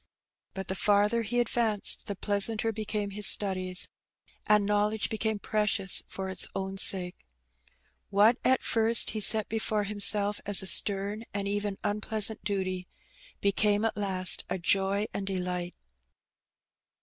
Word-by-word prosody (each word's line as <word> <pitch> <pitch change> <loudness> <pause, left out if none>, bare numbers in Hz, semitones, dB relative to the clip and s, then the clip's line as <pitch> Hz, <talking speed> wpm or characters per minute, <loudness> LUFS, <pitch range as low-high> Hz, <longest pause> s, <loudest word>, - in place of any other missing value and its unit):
But 190 0 -6
the - - -3
farther 205 +3 +1
he 240 +2 -2
advanced 225 -3 -1
the 200 - -4
pleasanter 210 +3 0
became 210 -1 -5
his 205 0 +4
studies, 185 -2 0 0.6
and 210 -1 +3
knowledge 210 +2 -1
became 220 0 -2
precious 210 -2 0
for 190 0 -7
its 190 -1 -1
own 190 0 -5
sake. 180 -2 +2 0.9
What 210 +4 +3
at 260 0 +1
first 225 0 +4
he 220 - -4
set 215 0 +4
before 220 -1 -2
himself 205 0 +1
as 200 -1 +4
a - - -7
stern 200 +3 +2
and 200 -1 -3
even 205 0 -3
unpleasant 210 0 +1
duty, 185 -2 -4 0.5
became 205 +2 +1
at 225 - -1
last 190 -3 0
a - - -2
joy 195 +3 0
and 195 - -5
delight. 180 -2 -4
205 Hz, 135 wpm, -27 LUFS, 195-215 Hz, 0.9 s, his